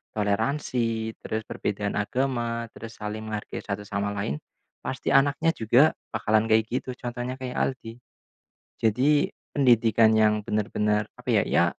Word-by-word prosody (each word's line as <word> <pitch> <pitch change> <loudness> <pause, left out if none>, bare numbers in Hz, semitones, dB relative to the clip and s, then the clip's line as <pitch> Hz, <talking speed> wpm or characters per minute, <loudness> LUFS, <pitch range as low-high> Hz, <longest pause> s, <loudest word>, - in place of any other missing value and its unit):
toleransi, 110 +1 0
terus 110 0 -3
perbedaan 105 -1 -2
agama, 115 0 -1
terus 115 0 -10
saling 105 +1 -4
menghargai 105 -1 -4
satu 100 0 -3
sama 100 0 -2
lain, 75 -8 -2 0.4
pasti - - -3
anaknya 145 +4 +4
juga 120 -1 +4 0.3
bakalan 110 0 +2
kayak 110 0 +4
gitu, 130 0 -3
contohnya 125 0 -4
kayak 130 -1 -6
Aldi. 120 -3 -3 0.8
Jadi 130 +7 +3 0.3
pendidikan 115 -4 +4
yang 105 -1 +3
benar-benar, 105 0 0
apa - - -8
ya, - - +4
ya - - +3
110 Hz, 130 wpm, -26 LUFS, 105-125 Hz, 0.8 s, anaknya